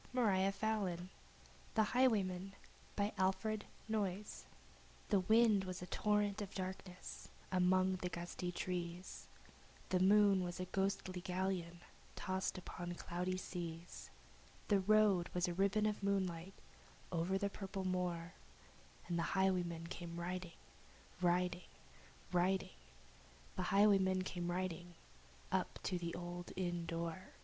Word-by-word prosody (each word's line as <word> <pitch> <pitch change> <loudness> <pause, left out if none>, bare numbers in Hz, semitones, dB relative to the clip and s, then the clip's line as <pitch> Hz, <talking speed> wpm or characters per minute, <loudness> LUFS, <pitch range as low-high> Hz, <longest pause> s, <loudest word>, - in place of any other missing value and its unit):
U - - +2
V. 245 - +4
W 205 - +4
X. 195 - -2
Y 210 -5 +1
Z 175 - -7 0.7
The 220 - +5
Highwayman 200 -6 +2 0.4
THE 205 +1 +1 1.6
wind 220 -3 +6
was 185 -1 -5
a - - -4
torrent 210 +2 +1
of 200 -1 -6
darkness 185 -1 -6 0.2
upon 185 0 +3
the 180 0 -3
gusty 175 +1 -4
trees, 175 0 -4 0.6
The 185 - +3
moon 200 0 +6
was 175 0 -4
a 185 - -1
ghostly 190 -1 -1
galleon 180 -2 -2 0.3
tossed 185 0 -1
upon 175 -1 -5
cloudy 180 +2 -2
seas, 170 -2 -6 0.6
The 200 -2 +5
road 200 -3 +4
was 180 +1 +2
a 175 - -1
ribbon 200 +3 +2
of 210 -1 0
moonlight 190 -2 -1 0.6
looping 175 +2 +1
the 200 +1 -1
purple 195 -1 -4
moor, 180 -2 -1 0.7
And 170 -1 0
the 170 +3 -1
highwayman 175 -3 +1
came 170 0 -6
riding 180 0 -4 0.6
Riding 180 0 +1 0.6
riding 180 - +1 0.8
The 185 - -1
highwayman 195 -2 +5
came 175 -1 -3
riding, 175 -1 -3 0.6
up - - 0
to 180 -2 0
the 170 -1 -3
old 175 0 -5
inn 175 -2 -1
door. 170 +2 -4
185 Hz, 125 wpm, -38 LUFS, 175-195 Hz, 1.6 s, wind